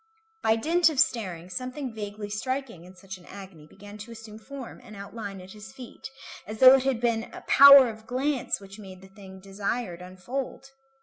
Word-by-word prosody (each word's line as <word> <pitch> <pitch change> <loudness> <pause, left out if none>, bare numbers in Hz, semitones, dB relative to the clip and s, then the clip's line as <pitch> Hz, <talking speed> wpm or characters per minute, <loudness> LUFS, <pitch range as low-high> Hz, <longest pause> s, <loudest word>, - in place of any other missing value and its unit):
By 220 - +3
dint 330 +8 +2
of 300 -4 -3
staring, 185 -10 0
something 255 +4 -5
vaguely 205 -1 -7
striking 245 -4 -4
in 185 +1 -15
such 190 0 -10
an 175 - -19
agony 190 -6 -12
began 205 +4 -13
to 225 +3 -10
assume 220 -1 -11
form 265 +2 -10
and 215 - -13
outline 200 0 -8
at 185 +1 -12
his 210 +1 -12
feet, 250 0 -11 0.4
as 215 +1 -7
though 255 +3 +9
it 265 -1 +3
had 265 -4 0
been 230 -1 0
a - - -10
power 280 -2 +8
of 220 -1 -9
glance 265 +2 -1
which 195 +1 -13
made 190 -2 -12
the 190 - -15
thing 190 -1 -13
desired 195 -1 -4
unfold. 240 +10 -6
215 Hz, 190 wpm, -26 LUFS, 195-255 Hz, 0.4 s, though